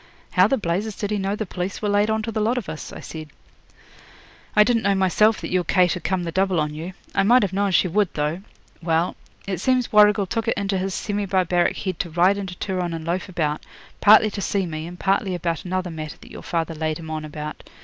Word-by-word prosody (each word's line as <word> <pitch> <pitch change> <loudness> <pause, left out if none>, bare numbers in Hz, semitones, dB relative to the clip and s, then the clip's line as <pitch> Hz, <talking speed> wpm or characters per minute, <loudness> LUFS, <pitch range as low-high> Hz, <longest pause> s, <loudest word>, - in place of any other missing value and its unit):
'How 185 +1 +5
the 270 - +1
blazes 200 +2 -2
did 205 0 -3
he 210 - 0
know 195 +1 -1
the 215 - -3
police 180 +1 -4
were 210 - -2
laid 205 +1 +2
on 220 0 0
to 225 - -3
the 220 - -2
lot 230 +4 +1
of 235 - -3
us?' 155 - -6
I - - -9
said. 155 -2 -8 1.3
'I 210 - +8
didn't 230 0 +2
know 200 -1 +2
myself 205 +4 +3
that - - -5
your 180 -1 +2
Kate 180 -1 +3
had 180 - -6
come 190 -2 0
the 170 - -3
double 190 0 +1
on 150 -1 -1
you. 165 +5 -6 0.2
I - - +3
might 240 +5 +5
have 195 -2 -1
known 200 +1 +1
she 185 0 +3
would, 200 +2 +1
though. 150 +4 -1 0.4
Well, 165 +1 +1 0.3
it 190 -4 -3
seems 255 0 +1
Warrigal 210 -1 +6
took 225 +4 -3
it - - +1
into 195 -1 -1
his 190 0 -2
semi 205 -1 -2
barbaric 180 -2 +1
head 185 -4 -4
to 175 - -2
ride 180 +5 +3
into 190 -2 -5
Turon 180 -3 -2
and 160 -1 -6
loaf 180 +3 -2
about, 155 -4 -1 0.4
partly 215 +1 +6
to 200 - -5
see 195 -1 0
me, 155 -1 -5
and 175 +1 -10
partly 195 -1 +1
about 170 0 -3
another 185 0 -2
matter 155 -2 -6
that - - -15
your - - -9
father 165 -1 -2
laid 155 0 -2
him 160 -1 -8
on 155 0 -3
about. 150 0 -6
185 Hz, 240 wpm, -23 LUFS, 170-205 Hz, 1.3 s, I